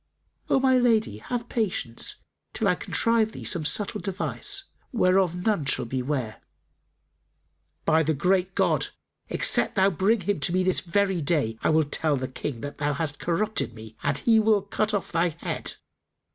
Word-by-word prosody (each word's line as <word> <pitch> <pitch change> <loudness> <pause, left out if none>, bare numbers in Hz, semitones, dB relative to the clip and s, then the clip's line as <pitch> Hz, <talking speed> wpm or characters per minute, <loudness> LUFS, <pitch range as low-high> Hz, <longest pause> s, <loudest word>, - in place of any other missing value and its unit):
"O - - +4
my 260 -1 +4
lady, 220 - +2
have 240 - -4
patience 190 - -2 0.3
till - - 0
I - - +4
contrive 230 -1 +1
thee - - -8
some 170 -5 -1
subtle 205 +7 0
device, 200 - -3 0.3
whereof 185 -5 +3
none 185 -2 0
shall 135 - 0
be 130 +2 -2
ware." 125 -5 -3 1.4
"By 160 +1 +4
the 160 0 +1
Great 185 +5 +1
God, - - +2 0.4
except - - +2
thou 195 0 +4
bring 195 +5 +2
him 205 -3 -1
to 170 - -1
me 185 0 +2
this 185 -5 +2
very 185 +2 0
day, 145 -7 +1
I - - +1
will 155 0 +4
tell 150 0 +1
the 130 0 -3
King 130 -2 -5
that 145 +1 -7
thou 145 0 0
hast 145 -1 -2
corrupted 180 - -1
me, 110 0 -11
and 140 - 0
he 225 -2 +4
will 215 -2 +3
cut 210 +1 -1
off 200 -4 -2
thy 170 +1 +2
head!" - - -2
180 Hz, 175 wpm, -26 LUFS, 145-210 Hz, 1.4 s, O